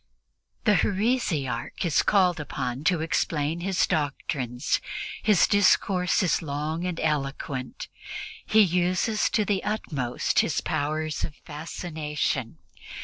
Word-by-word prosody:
The 210 -5 +4
heresiarch 185 - 0
is 165 - +3
called 180 -5 +3
upon 130 -2 -4
to 180 -3 +3
explain 160 0 0
his 185 0 +1
doctrines. 135 -4 -1 0.4
His 210 -5 +5
discourse 190 -2 +3
is 180 - +2
long 155 +3 -3
and 175 -2 -3
eloquent. 135 -3 -2 0.6
He 220 - +5
uses 185 +4 +2
to 210 0 +1
the 200 -1 0
utmost 145 - -1
his 155 - +2
powers 155 0 -2
of 150 - -4
fascination. 150 - -3
160 Hz, 110 wpm, -26 LUFS, 145-185 Hz, 0.6 s, His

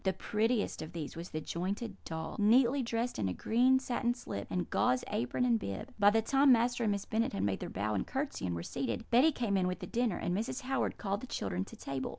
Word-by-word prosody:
The 190 - +1
prettiest 215 +4 0
of 160 +2 -7
these 155 -4 -5
was 170 +2 -7
the 155 - -4
jointed 195 +7 -3
doll, 160 0 -5
neatly 245 +6 +5
dressed 235 0 -2
in 100 - +1
a 90 - -3
green 250 +3 +3
satin 240 -2 -1
slip, 100 - -6
and 180 -1 -1
gauze 125 0 +2
apron 125 - 0
and 235 -2 +3
bib. 100 - -6
"By 205 0 +7
the 220 +1 +2
time 275 +3 +5
Master 240 0 +3
and 210 - +2
Miss 200 -1 -2
Bennet 225 +1 0
had 95 - -1
made 100 -1 0
their - - -5
bow 105 +3 -2
and 100 - -1
curtsey, 270 - -3
and 85 - -2
were 85 - -4
seated, 235 - -3
Betty 260 +7 +6
came 235 -7 -1
in 185 -1 +2
with 180 - -2
the - - -7
dinner, 235 -5 0
and 175 - -1
Mrs. 230 +6 -2
Howard 265 0 -1
called 200 +1 -2
the 255 - -7
children 95 - -2
to - - -12
table. 135 -1 -4
210 Hz, 245 wpm, -32 LUFS, 160-245 Hz, -, By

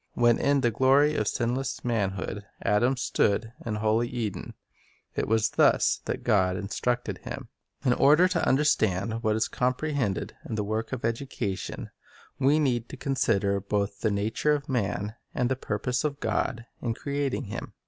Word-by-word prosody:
When 120 -1 +3
in 140 -1 +3
the 120 -2 +2
glory 135 +6 +4
of 105 -8 0
sinless 125 +2 -2
manhood 105 -3 -1 0.2
Adam 120 +6 +2
stood 115 -2 +1
in 110 -2 -2
holy 110 +2 +1
Eden, 115 -5 -4 0.6
it - - -1
was 110 0 +2
thus - - +3
that - - -3
God 95 -3 +2
instructed 120 +5 -2
him. - - -7 0.4
In 125 - +4
order 150 +8 +5
to 175 -3 0
understand 115 -6 +2
what 110 -2 +1
is 110 - +1
comprehended 125 - -1
in - - -5
the 105 - -1
work 110 +2 -2
of 130 -4 -3
education, 115 -4 -3 0.5
we 140 +3 +4
need 125 -6 0
to - - -8
consider 105 -7 +1
both 100 0 -2
the 110 - +2
nature 105 +9 +1
of 145 0 -2
man 105 -5 -1 0.2
and 125 0 +1
the 130 - +1
purpose 125 +1 -2
of 145 -2 -2
God 115 -2 -1 0.2
in 115 -2 -1
creating 140 0 -2
him. 105 - -6
120 Hz, 160 wpm, -27 LUFS, 105-135 Hz, 0.6 s, order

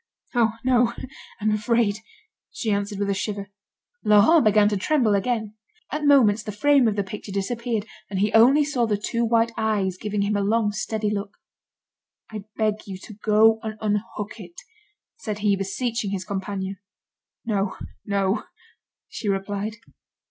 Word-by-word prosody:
"Oh! 230 -3 +3
no, 245 -2 +3 0.5
I'm 215 0 +1
afraid," 215 0 +1 0.5
she 220 - -2
answered 200 0 -1
with 200 0 0
a - - +2
shiver. 200 0 -4 0.5
Laurent 210 +10 +6
began 210 -1 +5
to 210 - -1
tremble 235 +1 +2
again. 215 +1 -1 0.4
At 300 0 -2
moments 235 -7 +5
the 210 - -6
frame 270 +4 +4
of 215 - +1
the 200 - 0
picture 200 +1 -8
disappeared, 225 +2 -2 0.2
and 195 - -3
he 205 +2 +1
only 265 +7 +6
saw 255 -5 0
the 210 -2 +1
two 230 +3 -2
white 230 0 +2
eyes 205 -4 0
giving 210 -1 -1
him 205 +1 0
a 205 - +1
long, 210 +1 +1
steady 215 0 -2
look. 200 0 -4 0.9
"I 210 -2 -7
beg 215 -1 -1
you 190 -2 -6
to 215 +3 -11
go 220 +1 +4
and 215 -1 -5
unhook 210 +1 -3
it," 175 -4 -11 0.6
said 215 - -4
he, 200 -1 +4
beseeching 210 +3 -2
his 190 -2 -3
companion. 195 0 -4 0.7
"No, 200 -3 -1 0.3
no," 200 0 0 0.6
she 210 - -4
replied. 200 +2 -2
210 Hz, 155 wpm, -24 LUFS, 200-230 Hz, 0.9 s, Laurent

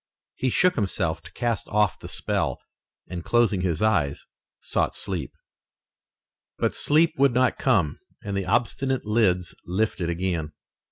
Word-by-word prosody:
He 130 - 0
shook 180 +8 +3
himself 80 - -1
to 85 - -14
cast 120 -3 -1
off 105 -2 +1
the - - -9
spell, - - -1 0.5
and, 85 -2 -6
closing 110 -2 +2
his 85 -1 0
eyes, 85 -11 +1 0.3
sought - - -1
sleep. - - -3 1.3
But - - 0
sleep 160 +2 +3
would 135 -3 +4
not 125 -1 +2
come 80 -6 +2 0.2
and 100 -1 -3
the 95 -1 -2
obstinate 130 +6 0
lids 100 -5 +2
lifted 90 -1 -1
again. 85 -3 -2
100 Hz, 135 wpm, -25 LUFS, 85-120 Hz, 1.3 s, would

